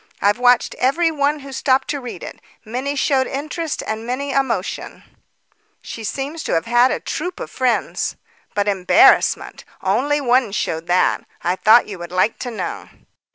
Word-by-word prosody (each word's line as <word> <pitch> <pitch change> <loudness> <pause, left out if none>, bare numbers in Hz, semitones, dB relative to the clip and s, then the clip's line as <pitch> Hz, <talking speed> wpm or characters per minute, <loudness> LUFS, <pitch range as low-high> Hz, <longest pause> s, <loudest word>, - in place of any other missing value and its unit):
I've 205 +3 +2
watched 245 -1 +3
every 325 +6 +2
one 290 0 0
who 275 0 -10
stopped 265 0 +1
to 285 -2 -2
read 245 - -8
it. - - -9 0.2
Many 255 +6 -3
showed 270 -1 +1
interest 305 +3 -4
and 220 +1 -4
many, 260 +4 -3
emotion; 245 -9 -2 0.8
she 225 - -8
seems 280 +8 -4
to - - -1
have 165 0 +1
had 240 +2 +4
a - - -1
troop 360 0 -4
of - - -6
friends. 255 -2 -1 0.4
But 205 0 0
embarrassment! 205 - +3 0.2
only 290 +2 +1
one 250 -5 +2
showed 165 -4 -2
that. 180 +1 +2 0.2
I 175 +1 +1
thought 220 +5 +5
you 195 -4 -8
would 175 0 -8
like 185 +5 +1
to 250 - -4
know." 230 - -5
250 Hz, 165 wpm, -20 LUFS, 215-280 Hz, 0.8 s, thought